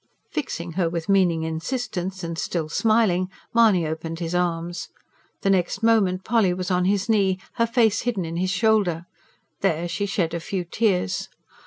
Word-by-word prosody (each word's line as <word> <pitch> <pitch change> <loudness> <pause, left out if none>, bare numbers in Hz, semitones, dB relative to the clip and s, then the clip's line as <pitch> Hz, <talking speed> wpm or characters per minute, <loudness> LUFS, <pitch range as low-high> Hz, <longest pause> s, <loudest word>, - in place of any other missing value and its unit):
Fixing 175 - -4
her 170 0 0
with 165 -1 -4
meaning 180 -5 +3
insistence 180 +2 -3
and 170 0 -3
still 165 0 -2
smiling, 210 -3 +2 0.2
Mahony 215 -7 +4
opened 160 +1 -4
his 165 0 -4
arms. 175 -1 -1 0.5
The 195 - +2
next 185 +3 0
moment 195 -5 +3
Polly 215 -6 +2
was 185 0 -3
on 180 0 +2
his 200 0 +1
knee, 195 -4 +2 0.2
her 230 0 +3
face 230 -3 +3
hidden 225 -7 -1
in 165 +1 -4
his 185 +1 0
shoulder. 200 -5 +2 0.5
There 175 -3 0
she 170 +4 -2
shed 180 -4 -1
a 170 - -1
few 180 +2 -3
tears. 180 - 0
185 Hz, 165 wpm, -24 LUFS, 170-205 Hz, 0.5 s, Mahony